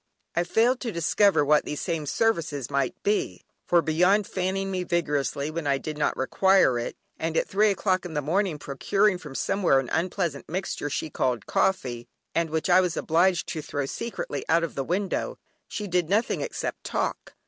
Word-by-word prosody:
I 175 Hz, -, +2 dB
failed 240 Hz, +7 st, +2 dB
to 235 Hz, -, -3 dB
discover 170 Hz, -1 st, +3 dB
what 150 Hz, +1 st, +4 dB
these 150 Hz, -, -4 dB
same 165 Hz, -4 st, -2 dB
services 165 Hz, -, 0 dB
might 140 Hz, -2 st, 0 dB
be, 205 Hz, +1 st, 0 dB, 0.2 s
for 170 Hz, -1 st, +4 dB
beyond 180 Hz, +6 st, +3 dB
fanning 190 Hz, +1 st, -2 dB
me 185 Hz, -1 st, -1 dB
vigorously 150 Hz, -4 st, -1 dB
when 160 Hz, -2 st, -3 dB
I 140 Hz, -1 st, +3 dB
did 155 Hz, +3 st, -5 dB
not 150 Hz, -, 0 dB
require 190 Hz, -2 st, +3 dB
it, 120 Hz, -, -4 dB, 0.2 s
and 165 Hz, 0 st, -1 dB
at -, -, +1 dB
three 210 Hz, +2 st, +3 dB
o'clock 190 Hz, -1 st, +1 dB
in 175 Hz, -3 st, -7 dB
the 150 Hz, -, +1 dB
morning 180 Hz, +2 st, 0 dB
procuring 190 Hz, +8 st, +1 dB
me -, -, -18 dB
from 150 Hz, -5 st, -10 dB
somewhere 185 Hz, -5 st, +2 dB
an 130 Hz, -, -4 dB
unpleasant 170 Hz, -3 st, -1 dB
mixture 175 Hz, -4 st, -3 dB
she 150 Hz, +2 st, -3 dB
called 125 Hz, -6 st, -1 dB
coffee, 125 Hz, -11 st, 0 dB, 0.3 s
and 165 Hz, -1 st, +1 dB
which 160 Hz, 0 st, -1 dB
I 185 Hz, 0 st, +6 dB
was 180 Hz, -3 st, -1 dB
obliged 175 Hz, +2 st, +2 dB
to 160 Hz, -, -3 dB
throw 145 Hz, -1 st, -3 dB
secretly 145 Hz, -4 st, -4 dB
out 165 Hz, +2 st, +4 dB
of 165 Hz, -, -3 dB
the 135 Hz, -, -2 dB
window, 190 Hz, +7 st, -2 dB, 0.3 s
she 210 Hz, -, -5 dB
did 180 Hz, -3 st, 0 dB
nothing 215 Hz, +4 st, +1 dB
except -, -, -4 dB
talk. -, -, -3 dB
170 Hz, 190 wpm, -26 LUFS, 145-190 Hz, 0.3 s, I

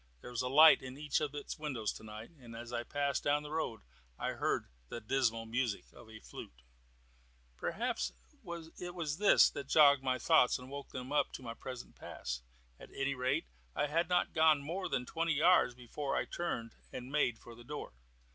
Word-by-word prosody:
There -, -, -9 dB
was 120 Hz, 0 st, -1 dB
a 125 Hz, -, -1 dB
light 155 Hz, +4 st, +8 dB
in 130 Hz, 0 st, -8 dB
each 150 Hz, 0 st, 0 dB
of 150 Hz, -1 st, -2 dB
its 145 Hz, -, -5 dB
windows 130 Hz, -8 st, -2 dB
tonight, 110 Hz, +3 st, -9 dB
and 115 Hz, -2 st, -11 dB
as 120 Hz, +1 st, -8 dB
I 120 Hz, -, 0 dB
passed 140 Hz, +3 st, -1 dB
down 145 Hz, +1 st, +2 dB
the 150 Hz, -, -8 dB
road 155 Hz, -8 st, -2 dB, 0.4 s
I -, -, -2 dB
heard -, -, 0 dB, 0.2 s
the -, -, -5 dB
dismal 115 Hz, -1 st, +1 dB
music 115 Hz, -2 st, -2 dB
of 120 Hz, -2 st, -14 dB
a 110 Hz, 0 st, -10 dB
flute. 60 Hz, -, -11 dB, 0.9 s
Perhaps -, -, -2 dB, 0.7 s
it 175 Hz, 0 st, -6 dB
was 155 Hz, -3 st, -2 dB
this 210 Hz, -, +7 dB
that 140 Hz, -2 st, -6 dB
jogged 140 Hz, -2 st, +7 dB
my 130 Hz, -1 st, +1 dB
thoughts 140 Hz, -2 st, +4 dB
and 125 Hz, +1 st, -11 dB
woke 140 Hz, 0 st, -6 dB
them 130 Hz, +1 st, -6 dB
up 150 Hz, -, +2 dB
to -, -, -7 dB
my 115 Hz, -1 st, -5 dB
present 125 Hz, +1 st, -8 dB
pass. -, -, -5 dB, 0.4 s
At -, -, -12 dB
any 135 Hz, 0 st, 0 dB
rate, 130 Hz, -, 0 dB, 0.3 s
I -, -, +2 dB
had 165 Hz, +4 st, 0 dB
not 180 Hz, 0 st, +2 dB
gone 155 Hz, -3 st, +5 dB
more 180 Hz, +6 st, -3 dB
than 125 Hz, -, -1 dB
twenty 165 Hz, +2 st, 0 dB
yards 155 Hz, -4 st, +5 dB
before 125 Hz, +3 st, -4 dB
I -, -, +1 dB
turned 115 Hz, -10 st, -3 dB, 0.2 s
and 125 Hz, +1 st, -7 dB
made 135 Hz, -6 st, +2 dB
for 120 Hz, -, -12 dB
the 120 Hz, +1 st, -13 dB
door. 145 Hz, +4 st, -6 dB
135 Hz, 195 wpm, -34 LUFS, 120-150 Hz, 0.9 s, light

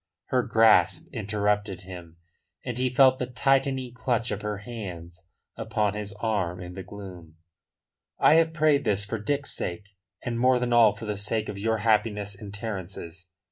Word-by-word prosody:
Her 130 Hz, -, +3 dB
grasp 110 Hz, -7 st, +4 dB
interrupted 105 Hz, -2 st, -1 dB
him, 90 Hz, -3 st, -11 dB, 0.5 s
and 125 Hz, -, -3 dB
he 130 Hz, 0 st, +2 dB
felt 130 Hz, +1 st, +5 dB
the 125 Hz, -, -2 dB
tightening 130 Hz, 0 st, +1 dB
clutch 120 Hz, -1 st, -1 dB
of -, -, -3 dB
her 105 Hz, -1 st, -3 dB
hands 90 Hz, -6 st, -8 dB, 0.3 s
upon 105 Hz, -2 st, -1 dB
his 105 Hz, -1 st, -5 dB
arm 100 Hz, -5 st, -2 dB
in 90 Hz, 0 st, -8 dB
the 95 Hz, -, -6 dB
gloom. 90 Hz, -4 st, -10 dB, 0.8 s
"I -, -, +5 dB
have 165 Hz, 0 st, +4 dB
prayed 155 Hz, -3 st, +3 dB
this 100 Hz, -2 st, 0 dB
for 110 Hz, +2 st, -4 dB
Dick's 140 Hz, +6 st, -2 dB
sake, 90 Hz, +4 st, -5 dB, 0.3 s
and 115 Hz, -1 st, -2 dB
more 130 Hz, +1 st, +4 dB
than 125 Hz, -1 st, -1 dB
all 115 Hz, -3 st, +6 dB
for 110 Hz, +2 st, -9 dB
the 105 Hz, -1 st, -3 dB
sake 105 Hz, +2 st, -2 dB
of 100 Hz, -, -6 dB
your 110 Hz, +2 st, +1 dB
happiness 105 Hz, -2 st, +1 dB
and 100 Hz, 0 st, -9 dB
Terence's. 95 Hz, -4 st, -7 dB
105 Hz, 170 wpm, -26 LUFS, 95-120 Hz, 0.8 s, all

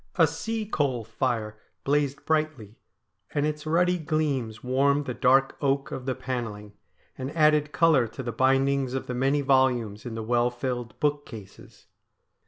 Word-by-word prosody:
A -, -, +6 dB
sea 225 Hz, -1 st, -3 dB
coal 140 Hz, -, -1 dB
fire 110 Hz, -1 st, -2 dB, 0.2 s
blazed 140 Hz, -1 st, 0 dB
brightly, 155 Hz, -9 st, -1 dB, 0.6 s
and 145 Hz, 0 st, +2 dB
its 150 Hz, 0 st, -3 dB
ruddy 180 Hz, +3 st, +2 dB
gleams 140 Hz, -8 st, -2 dB
warmed 140 Hz, +3 st, +2 dB
the 125 Hz, -, -3 dB
dark 135 Hz, +2 st, +3 dB
oak 140 Hz, -1 st, 0 dB
of 130 Hz, 0 st, -6 dB
the 130 Hz, -, 0 dB
panelling, 115 Hz, -6 st, -5 dB, 0.5 s
and 130 Hz, +1 st, -3 dB
added 150 Hz, -1 st, +4 dB
colour 155 Hz, -9 st, +4 dB
to 130 Hz, +4 st, -8 dB
the 120 Hz, -, -3 dB
bindings 135 Hz, +2 st, +2 dB
of 130 Hz, -, -3 dB
the 125 Hz, -, -4 dB
many 135 Hz, +3 st, +1 dB
volumes 125 Hz, -6 st, +2 dB
in 120 Hz, -2 st, -6 dB
the 110 Hz, -, -4 dB
well 120 Hz, +1 st, +2 dB
filled 120 Hz, -2 st, -5 dB
bookcases. 145 Hz, -9 st, -5 dB
130 Hz, 155 wpm, -26 LUFS, 120-145 Hz, 0.6 s, A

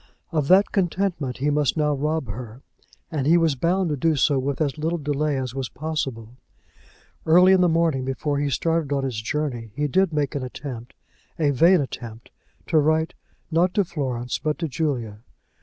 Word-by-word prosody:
Of 155 Hz, -4 st, 0 dB
that 190 Hz, +4 st, +5 dB
contentment 175 Hz, -8 st, -1 dB
he 145 Hz, +2 st, 0 dB
must 145 Hz, +1 st, +1 dB
now 150 Hz, -1 st, +2 dB
rob 150 Hz, +1 st, -1 dB
her, 115 Hz, +3 st, -8 dB, 0.5 s
and 145 Hz, -4 st, -1 dB
he 170 Hz, +3 st, +6 dB
was 165 Hz, -3 st, +3 dB
bound 175 Hz, +6 st, 0 dB
to -, -, 0 dB
do 160 Hz, +3 st, +1 dB
so 140 Hz, 0 st, +2 dB
with 135 Hz, +1 st, -2 dB
as 150 Hz, -1 st, -1 dB
little 165 Hz, +3 st, -1 dB
delay 145 Hz, -1 st, -1 dB
as 130 Hz, -2 st, -3 dB
was 135 Hz, -2 st, -4 dB
possible. 130 Hz, -6 st, -4 dB, 0.9 s
Early 180 Hz, +4 st, +6 dB
in 185 Hz, -, +4 dB
the 180 Hz, -, +4 dB
morning 165 Hz, -5 st, +1 dB
before 140 Hz, +2 st, -2 dB
he 145 Hz, 0 st, 0 dB
started 160 Hz, +2 st, 0 dB
on 140 Hz, -1 st, 0 dB
his 125 Hz, -5 st, -3 dB
journey 120 Hz, -2 st, -3 dB
he 150 Hz, -, 0 dB
did 190 Hz, +5 st, +2 dB
make 150 Hz, -2 st, -1 dB
an 140 Hz, -, -2 dB
attempt, 125 Hz, -1 st, -7 dB, 0.4 s
a 150 Hz, -4 st, +2 dB
vain 170 Hz, +6 st, +5 dB
attempt, 120 Hz, -4 st, -8 dB, 0.3 s
to 160 Hz, -, +3 dB
write, 155 Hz, +2 st, +1 dB, 0.4 s
not 175 Hz, +3 st, +2 dB
to 205 Hz, -, +3 dB
Florence 125 Hz, -7 st, -3 dB
but 150 Hz, -1 st, -1 dB
to 165 Hz, -, -2 dB
Julia. 130 Hz, -9 st, -2 dB
150 Hz, 185 wpm, -23 LUFS, 130-165 Hz, 0.9 s, he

